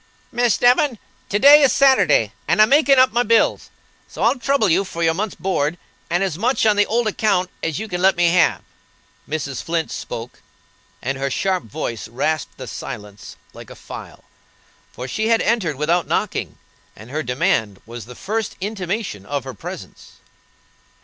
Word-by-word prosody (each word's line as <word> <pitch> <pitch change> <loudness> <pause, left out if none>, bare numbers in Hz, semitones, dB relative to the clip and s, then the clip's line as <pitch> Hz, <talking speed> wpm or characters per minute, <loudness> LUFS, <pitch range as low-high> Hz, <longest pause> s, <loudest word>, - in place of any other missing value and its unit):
"Miss 240 -2 +2
Devon, 245 +1 +3 0.3
to 205 - +1
day 285 +6 +8
is 275 - +5
Saturday, 270 -1 +4
and - - +1
I'm 215 +1 +6
makin' 280 -1 +5
up 255 -2 +5
my 240 - +3
bills, 230 -1 +2 0.4
so - - -6
I'll 275 - +2
trouble 275 -3 +2
you 185 +3 +3
for 170 -3 -5
your 165 0 +3
month's 205 +4 -3
board, 175 -4 -1 0.3
and 175 +3 +1
as 185 -4 -3
much 245 +2 +1
on 215 -1 +4
the 205 0 +3
old 235 +1 0
account 195 -4 0
as 160 -3 -2
you 220 - -4
can 180 -3 -4
let 190 +1 +4
me 175 -1 +4
have." 175 -1 +2 0.7
Mrs. 145 -3 -3
Flint 165 -1 -2
spoke, 115 +2 -7 0.6
and 135 +2 -2
her 140 0 -1
sharp 185 +6 -1
voice 115 +1 -5
rasped 140 +7 -2
the - - -7
silence 105 -1 -8 0.2
like - - -12
a - - -11
file, - - -11 0.7
for 125 +2 -7
she 215 - -2
had 230 0 +3
entered 205 -10 0
without 165 +5 0
knocking, - - -2 0.4
and 110 +4 -13
her 155 +2 -2
demand 110 -7 0
was 115 -1 -9
the 125 - -11
first 215 - -3
intimation 195 - -4
of 140 -2 -3
her 130 -1 -7
presence. 105 - -10
185 Hz, 175 wpm, -20 LUFS, 140-225 Hz, 0.7 s, day